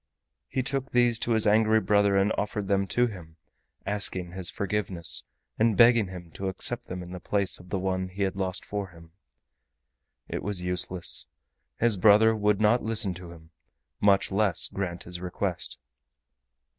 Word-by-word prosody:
He 130 - -2
took 135 +1 -2
these 120 -2 +3
to 120 - 0
his 110 -1 +3
angry 110 +1 +4
brother 100 -2 +2
and 100 +2 +2
offered 105 -1 -3
them 100 0 +1
to 120 +7 +2
him, 90 -8 -8 0.5
asking 95 -3 0
his 90 -1 -4
forgiveness, 95 -4 -1 0.3
and 110 -2 +2
begging 115 -3 +5
him 90 -2 -10
to 95 - -5
accept 120 +6 -1
them 90 0 -6
in 90 - -11
the 90 - -7
place 100 +1 -1
of 90 - -15
the 100 - -2
one 95 0 -2
he 95 +2 -4
had 95 -1 -1
lost 95 -2 -3
for 100 -1 -4
him. 85 -2 -17 1.2
It - - -4
was 100 -2 -3
useless; 90 0 0 0.5
his 115 -3 +2
brother 110 +3 +5
would 105 -1 +1
not 110 +3 +3
listen 110 -3 +2
to 90 0 -10
him, 80 -1 -15 0.5
much 100 -1 +3
less 100 -3 +3
grant 90 -3 -4
his 90 0 -7
request. 90 -7 -3
100 Hz, 170 wpm, -27 LUFS, 90-110 Hz, 1.2 s, begging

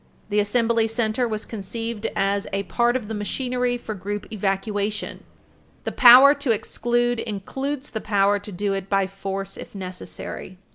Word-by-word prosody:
The 210 0 +2
Assembly 225 +2 +2
Center 225 +1 0
was 215 -1 -3
conceived 225 +1 -4
as 200 0 0
a 195 0 -1
part 240 +6 +1
of 245 -5 -2
the 220 - -4
machinery 245 +3 -1
for 225 -2 -6
group 205 +1 -5
evacuation. 205 +1 -2 0.6
The - - -3
power 255 +3 +9
to 285 -2 -4
exclude 240 +2 +1
includes 265 +7 -4
the 220 - -4
power 205 -1 +2
to 205 +1 -9
do 200 +2 -1
it 195 0 -4
by 195 -1 +2
force 195 0 -5
if - - -10
necessary. 185 0 -7
210 Hz, 155 wpm, -23 LUFS, 195-240 Hz, 0.6 s, power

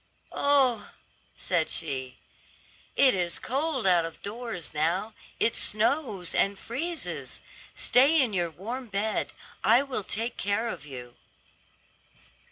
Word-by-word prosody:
"Oh," 270 -6 +2 0.5
said 170 -4 0
she, 130 -5 -2 0.8
"it 265 -2 +6
is 175 -2 0
cold 275 -1 -1
out 180 -3 +5
of 165 -1 -7
doors 215 -6 -5
now; 170 +8 0 0.3
it 230 - +3
snows 215 - +1
and 195 0 +2
freezes. 325 - -4 0.4
Stay 280 +6 +4
in 250 -6 +2
your 175 -2 +1
warm 235 +10 -6
bed; 210 +1 -1 0.3
I 235 +5 +5
will 265 -7 -3
take 225 +5 -3
care 205 +4 0
of 150 - -7
you." 125 -3 -9
215 Hz, 120 wpm, -28 LUFS, 175-255 Hz, 0.8 s, it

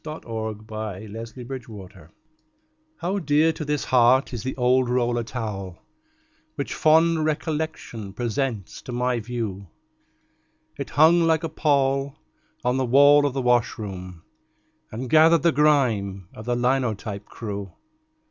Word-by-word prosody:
THE 155 - -5
OLD 110 -2 -5
ROLLER 110 0 -6
TOWEL 110 - -10 0.9
How 195 -4 -2
dear 155 -1 +2
to 155 - -6
this 150 -1 -1
heart 130 +1 +3
is 120 - -4
the 130 - -5
old 125 0 +2
roller 120 -1 0
towel 105 -6 -6 0.7
Which 140 - -4
fond 160 +1 +3
recollection 155 - -3
presents 120 -3 -3
to - - -9
my 125 0 0
view. 110 -4 -5 1.1
It - - -6
hung 160 +4 +5
like 160 0 +2
a 165 - -2
pall 140 -3 +1 0.5
on 125 +1 +2
the 130 - +1
wall 145 +3 +6
of 140 - -4
the 135 -1 -2
washroom, 100 -7 -1 0.7
And 120 +4 -5
gathered 160 +3 +5
the 170 - +4
grime 115 - +1
of 110 - -10
the 120 0 0
linotype 120 -5 -1
crew. 100 -3 -6
125 Hz, 130 wpm, -24 LUFS, 110-145 Hz, 1.1 s, wall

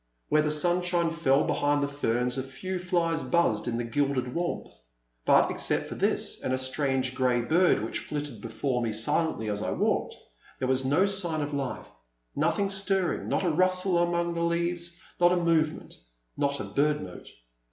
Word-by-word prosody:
Where 155 - +4
the 150 - 0
sunshine 175 +2 +1
fell 150 -5 +2
among 145 0 +1
the 140 - +1
ferns 125 -3 -1
a 135 - -1
few 160 +8 -5
flies 170 -2 0
buzzed 170 -12 +1
in 115 -1 -1
the 120 - -2
gilded 130 +1 -1
warmth; 175 +1 -3 0.5
but - - +5
except - - 0
for - - -6
this - - -1
and - - -2
a - - -2
strange 130 0 0
grey 125 -2 +1
bird 160 - +3
which 110 - -3
flitted 145 -7 -6
be 115 - -6
fore 125 +3 -2
me 115 -2 -1
silently 110 +2 +1
as 105 -1 -2
I - - -2
walked, - - 0 0.4
there 130 - -2
was 130 0 +2
no 145 +9 +3
sign 180 -6 0
of 145 0 -3
life, 140 -2 -3 0.5
nothing 200 -1 +1
stirring, 195 -2 -1
not - - 0
a 175 - +2
rustle 185 +2 +2
among 170 0 0
the 170 - -3
leaves, 170 0 -1 0.2
not 175 0 +5
a - - +2
movement, 165 -3 0 0.4
not 140 0 0
a - - -3
bird 150 -1 0
note. 90 -1 -10
150 Hz, 185 wpm, -27 LUFS, 130-175 Hz, 0.5 s, but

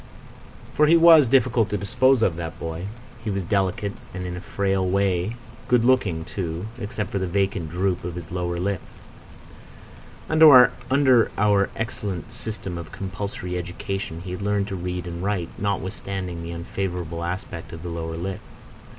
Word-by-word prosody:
For 150 - +4
he 165 +2 +7
was 165 -4 +8
difficult 125 -3 +3
to 105 - -1
dispose 130 +4 +3
of, 85 - +2
that 85 -1 -6
boy. 80 +3 -4 0.4
He 110 - -3
was 100 -2 -1
delicate 100 +2 0 0.2
and, 90 0 -4
in 90 0 -4
a 90 - -6
frail 95 +2 0
way, 95 +2 +1 0.3
good 120 -2 +3
looking 100 -11 +2
too, 85 -1 -4
except 105 -1 -4
for 100 - -1
the 95 - -1
vacant 95 -2 0
droop 90 +2 -1
of 85 -1 -5
his 85 -2 -8
lower 90 -1 -2
lip. 95 0 -1 1.5
Under 130 -4 +6
our 100 -1 +3
excellent 105 -7 -4
system 95 -5 -5
of 80 -3 -9
compulsory 95 -2 -4
education 90 -1 -5
he 90 0 -7
had 90 - -5
learned 100 0 0
to 95 - -3
read 90 0 -4
and 85 0 -5
write, 95 -4 -1
notwithstanding 95 -3 -3
the 85 - -6
unfavourable 85 -1 -4
aspect 85 -1 -5
of 80 0 -8
the 90 - -4
lower 80 -1 -4
lip. 95 +3 -4
95 Hz, 160 wpm, -24 LUFS, 85-105 Hz, 1.5 s, was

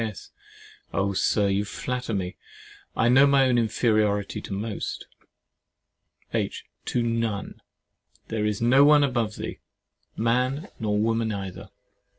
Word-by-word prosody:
S. 110 -4 -6 0.6
Oh! 100 +2 0
Sir, 100 +2 +2
you 100 +1 +1
flatter 125 +3 -4
me. 90 -2 -3 0.6
I 115 - +2
know 135 +3 +6
my 140 -1 +5
own 125 -1 +3
inferiority 110 -3 +1
to - - -9
most. 105 +2 -4 1.3
H. - - -2 0.2
To 120 - 0
none; 115 -3 -2 0.7
there 110 -1 -1
is 105 +1 -2
no 130 +4 +6
one 150 0 +6
above 120 -6 0
thee, - - -6 0.6
man 125 - 0
nor 105 -2 0
woman 115 +1 +1
either. 95 -3 -6
115 Hz, 130 wpm, -25 LUFS, 105-125 Hz, 1.3 s, know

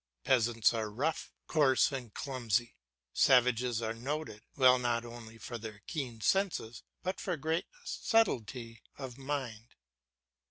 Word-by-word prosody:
Peasants 115 -3 +3
are 110 -2 -2
rough, 135 +10 -2
coarse, 145 -4 +4
and 125 -5 -5
clumsy; 120 -4 -1 0.4
savages 125 -2 +4
are 110 0 -1
noted, 130 -1 -4 0.2
not 125 -3 +4
only 115 -1 -10
for 120 +2 -6
their 105 -2 -8
keen 130 -8 -4
senses, 165 - 0 0.2
but 185 +1 -2
for 180 -3 -2
great 160 +3 -1 0.2
subtility 120 - 0 0.2
of 130 -2 -7
mind. 130 -5 -4
120 Hz, 120 wpm, -32 LUFS, 115-140 Hz, 0.4 s, coarse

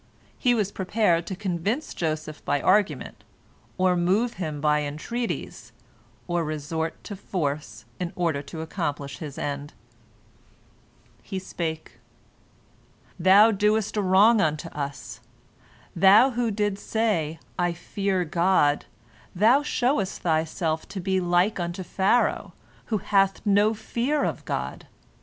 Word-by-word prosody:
He 245 -1 +2
was 205 -3 0
prepared 185 -4 +1
to 190 - -4
convince 200 - -2
Joseph 155 -2 -3
by 145 - 0
argument, 205 +6 +1 0.5
or 185 -1 +3
move 195 +8 +1
him 155 -3 -3
by 150 0 +2
entreaties, 155 +12 -4 0.5
or 175 -1 -1
resort 160 +1 -4
to 205 - -7
force, 145 - -4
in 175 -1 -3
order 165 -5 0
to 160 +3 -8
accomplish 145 -4 -4
his 150 -4 -7
end. 145 0 -4 1.5
He 190 - -6
spake: 160 -8 -5 1.2
"Thou 195 +5 +7
doest 210 +1 +1
a 210 - +1
wrong 200 +4 +5
unto 155 +1 -1
us. 140 -2 -6 0.8
Thou 200 +9 +6
who 240 -1 0
didst 205 -1 -2
say, 200 -9 0 0.2
'I 175 -1 +1
fear 190 +1 -2
God,' 170 -3 +2 0.5
thou 225 +9 +5
showest 245 -8 0
thyself 160 0 -1
to 195 -1 -6
be 190 +1 0
like 175 +3 +2
unto 175 +2 -3
Pharaoh, 195 +7 +1 0.3
who 220 - -1
hath 195 0 +1
no 205 +2 +3
fear 265 +7 -1
of - - -3
God. - - -4
185 Hz, 125 wpm, -25 LUFS, 160-210 Hz, 1.5 s, Thou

